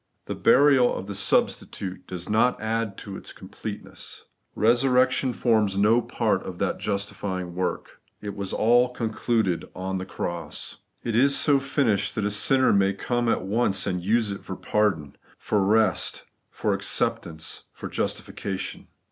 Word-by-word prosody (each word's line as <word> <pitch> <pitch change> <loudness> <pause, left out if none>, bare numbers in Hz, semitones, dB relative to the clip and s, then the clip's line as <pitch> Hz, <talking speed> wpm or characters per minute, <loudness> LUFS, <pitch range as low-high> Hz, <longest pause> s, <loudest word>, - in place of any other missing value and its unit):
The - - -3
burial 135 -2 +4
of 95 - -5
the 100 - -5
substitute 95 -1 0
does 90 -1 -5
not 110 +4 +2
add 110 -2 -2
to 100 - -7
its - - -8
completeness; - - -8 0.3
resurrection 125 +3 +3
forms 110 -5 +1
no 110 +4 +4
part - - 0
of - - -7
that - - -1
justifjdng 100 -3 -3
work. 90 +1 -4 0.2
It 100 -1 -6
was 100 -2 -3
all 120 +3 +4
concluded 110 -5 -1
on 95 +1 -3
the 95 0 -5
cross. 85 -5 -4 0.3
It 115 -2 -2
is 140 +4 +4
so 145 -2 +4
finished 135 -7 0
that 105 - -1
a 105 - 0
sinner 130 +6 +3
may 100 0 +2
at 120 -3 0
once 100 0 +1
use 100 +4 +1
it 100 - -6
for - - -6
pardon, 95 -10 0 0.2
for 105 - 0
rest, 105 0 +2 0.3
for - - -1
acceptance, 80 -2 -2
for - - -7
justification. 95 -2 -4
105 Hz, 145 wpm, -25 LUFS, 95-120 Hz, 0.3 s, burial